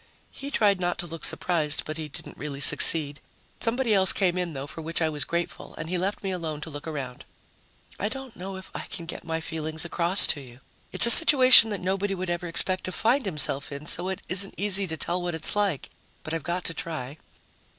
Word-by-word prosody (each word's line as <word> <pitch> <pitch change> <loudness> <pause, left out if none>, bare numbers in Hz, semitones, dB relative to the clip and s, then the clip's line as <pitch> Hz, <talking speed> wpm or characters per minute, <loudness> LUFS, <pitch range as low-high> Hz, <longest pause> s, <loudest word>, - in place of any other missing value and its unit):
He 275 - -8
tried 205 -8 +1
not 175 -1 -2
to - - -5
look 165 -1 -9
surprised, 160 -5 -1
but 155 +1 -7
he 155 -1 -6
didn't 145 - -13
really 140 -2 -7
succeed. 145 0 +3 0.4
Somebody 235 0 -1
else 190 -2 +6
came 185 -3 0
in, 180 -2 -4
though, 135 0 -6
for 155 +3 -10
which 165 +1 -4
I 160 -1 0
was 150 -3 -5
grateful, 170 0 -6
and 160 +2 -7
he 185 - -1
left 195 +4 -4
me 195 - -3
alone 160 -5 -5
to 160 - -8
look 145 +2 -9
around. 135 -5 -7 0.8
I 205 - -2
don't 265 -1 -9
know 190 +2 -8
if 190 - -12
I - - -8
can 170 - -8
get - - -9
my 165 -1 -4
feelings 160 0 -4
across 175 +2 +4
to 145 - -10
you. 125 -2 -15 0.3
It's - - +7
a 235 - +8
situation 260 -7 +9
that 205 -2 -5
nobody 195 +2 -2
would 185 -1 -5
ever 175 0 -4
expect 185 +2 +3
to 185 - -5
find 240 +6 0
himself 150 -5 +1
in, 140 +1 -8
so 175 +3 -1
it 190 0 -6
isn't 190 +1 -1
easy 200 -1 +1
to 160 -1 -6
tell 175 +4 -3
what 175 -1 -4
it's 160 +4 -2
like. 200 -8 -2 0.3
But 155 - -7
I've 165 - -3
got 175 +4 -4
to 165 - -3
try. 150 -4 -7
175 Hz, 225 wpm, -25 LUFS, 155-195 Hz, 0.8 s, situation